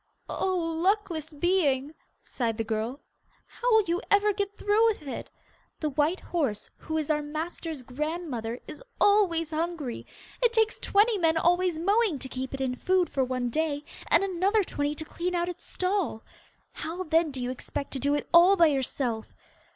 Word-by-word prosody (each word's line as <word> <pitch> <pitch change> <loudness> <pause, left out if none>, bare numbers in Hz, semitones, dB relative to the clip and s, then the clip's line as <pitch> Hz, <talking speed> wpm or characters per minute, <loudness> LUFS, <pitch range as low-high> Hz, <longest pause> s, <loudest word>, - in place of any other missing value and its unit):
'Oh, 375 -1 -1 0.3
luckless 355 -5 0
being!' 300 -4 +1 0.3
sighed 230 -3 -2
the 225 - 0
girl; 225 +5 -3 0.4
'how - - -2
will 440 -1 +6
you 345 0 -1
ever 410 +1 +4
get 405 0 -3
through 415 +2 +3
with 430 -8 -1
it. 275 - -6 0.5
The 305 -2 -1
white 300 +6 +1
horse, 275 - -2
who 315 - -4
is 310 -1 0
our 300 0 +1
master's 310 -1 -5
grandmother, 260 -4 -4
is - - -9 0.2
always 350 -6 +3
hungry: 315 -5 -3 0.3
it 475 -1 +3
takes 445 -1 +2
twenty 415 +1 +3
men 325 -2 +3
always 355 0 +2
mowing 400 0 +2
to 265 - -6
keep 260 0 -4
it 270 - -6
in 260 -1 0
food 365 +5 +1
for 270 - +1
one 250 -1 -2
day, 300 0 -1 0.2
and - - +4
another 390 +3 +2
twenty 290 -3 -2
to 315 - -6
clean 355 +3 -3
out 345 0 0
its 355 0 -8
stall. 365 - -1 0.5
How, 335 +4 -5
then, 325 -1 +2
do 270 -2 -6
you 250 0 -2
expect 260 +2 -5
to 270 - -3
do 285 +2 +2
it 290 - -3
all 350 +4 +8
by 345 -3 +6
yourself? 250 -4 -2
320 Hz, 175 wpm, -28 LUFS, 275-370 Hz, 0.5 s, all